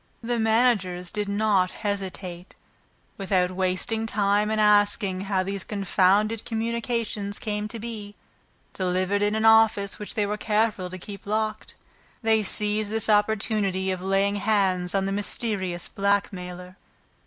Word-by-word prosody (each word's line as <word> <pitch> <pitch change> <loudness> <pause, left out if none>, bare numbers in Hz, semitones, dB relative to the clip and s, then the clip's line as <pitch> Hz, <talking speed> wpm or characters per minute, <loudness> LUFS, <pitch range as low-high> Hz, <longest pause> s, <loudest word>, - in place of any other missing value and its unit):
The 240 0 -1
managers 220 -6 +1
did 210 -1 -3
not 200 -3 +2
hesitate; 190 -3 -5 0.6
without 185 -2 +1
wasting 190 +5 0
time 205 0 +1
in 220 - 0
asking 205 -2 +3
how 195 -1 0
these 195 0 -4
confounded 205 +2 +1
communications 225 -2 -2
came 210 -1 -3
to 230 - -7
be 215 -2 -7 0.6
delivered 185 +2 0
in 205 +1 +1
an 220 0 0
office 220 -3 +4
which 210 - -7
they 210 -3 +1
were 210 +1 -2
careful 210 -3 0
to 185 - -7
keep 200 +2 -10
locked, 215 0 -2 0.5
they 220 -1 +3
seized 210 +1 +2
this 220 0 -1
opportunity 205 -2 +1
of 185 -1 -4
laying 195 +2 +1
hands, 195 -3 +1
on 195 -1 +1
the 195 - -2
mysterious 195 -3 -2
blackmailer. 185 -2 -2
205 Hz, 135 wpm, -25 LUFS, 190-215 Hz, 0.6 s, office